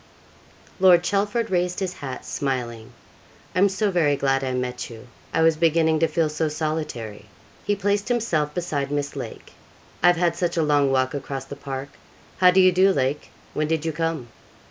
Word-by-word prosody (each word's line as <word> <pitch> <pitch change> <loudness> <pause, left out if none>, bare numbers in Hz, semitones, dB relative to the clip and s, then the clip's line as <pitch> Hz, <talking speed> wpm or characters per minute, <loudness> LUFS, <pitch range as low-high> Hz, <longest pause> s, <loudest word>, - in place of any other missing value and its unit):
Lord 180 -2 +6
Chelford 205 +4 0
raised 180 0 0
his 185 -2 -2
hat, 130 -5 -7
smiling: 120 -5 -3 0.6
'I - - 0
am 200 +1 +5
so 195 +2 0
very 155 -5 +2
glad 135 -1 +1
I 130 - -1
met 125 -1 -3
you, 115 0 -11 0.3
I 165 - +2
was 165 -1 +5
beginning 160 -1 +3
to 165 - +3
feel 160 0 +1
so 155 +1 -1
solitary!' 150 -9 -4 0.4
he 205 - +1
placed 200 +1 0
himself 175 -12 0
beside 150 -6 -2
Miss 145 -1 -2
Lake. - - -8 0.5
'I've 175 -1 +5
had 170 -1 +1
such 175 -1 -1
a 165 - +3
long 145 -2 +3
walk 130 -1 +1
across 135 -1 -5
the 140 - -8
park. 135 0 -6 0.5
How 180 - +7
do 180 +1 +4
you 185 0 +7
do, 190 +2 +4
Lake? 140 -2 -1 0.2
when 155 0 -1
did 160 0 -1
you 160 - 0
come?' 160 -5 -3
155 Hz, 185 wpm, -23 LUFS, 135-180 Hz, 0.6 s, How